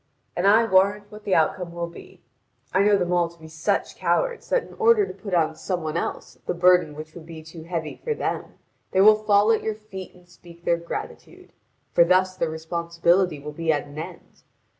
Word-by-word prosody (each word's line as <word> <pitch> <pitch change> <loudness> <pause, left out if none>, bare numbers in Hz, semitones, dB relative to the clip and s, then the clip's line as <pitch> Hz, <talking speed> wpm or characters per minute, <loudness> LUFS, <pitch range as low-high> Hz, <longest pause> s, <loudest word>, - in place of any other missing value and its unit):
And 180 +3 +1
I 220 +3 +6
warrant 200 +1 +2
what 210 0 -12
the 195 - +2
outcome 170 +2 0
will 170 0 -3
be: 170 - -13 0.5
I 190 - +4
know 205 0 +4
them 180 -1 -1
all 175 -1 +2
to 170 0 -20
be 160 - -12
such 160 0 -2
cowards - - 0
that - - +2
in - - -14
order 450 -2 +5
to - - -8
put 200 -4 -4
on 160 -2 +2
some 175 +1 -3
one 155 0 -3
else 170 - -4
the - - -1
burden 180 -3 +4
which 155 +1 -9
would 165 -2 -11
be 160 -2 -9
too 160 +1 -11
heavy 165 -3 -5
for 460 -2 -1
them, - - -4 0.3
they 190 - +2
will 215 +2 +9
fall 210 +1 +4
at 225 - +2
your 220 -1 -2
feet 195 -4 -10
and 180 0 -20
speak 170 -1 -17
their 170 - +3
gratitude; 170 0 -8 0.4
for - - +6
thus 185 +1 +2
their 170 -3 -1
responsibility 170 +2 0
will 150 +1 -7
be 160 +2 -1
at 145 -2 -1
an 145 +1 -9
end. 160 - -10
175 Hz, 215 wpm, -24 LUFS, 165-200 Hz, 0.5 s, will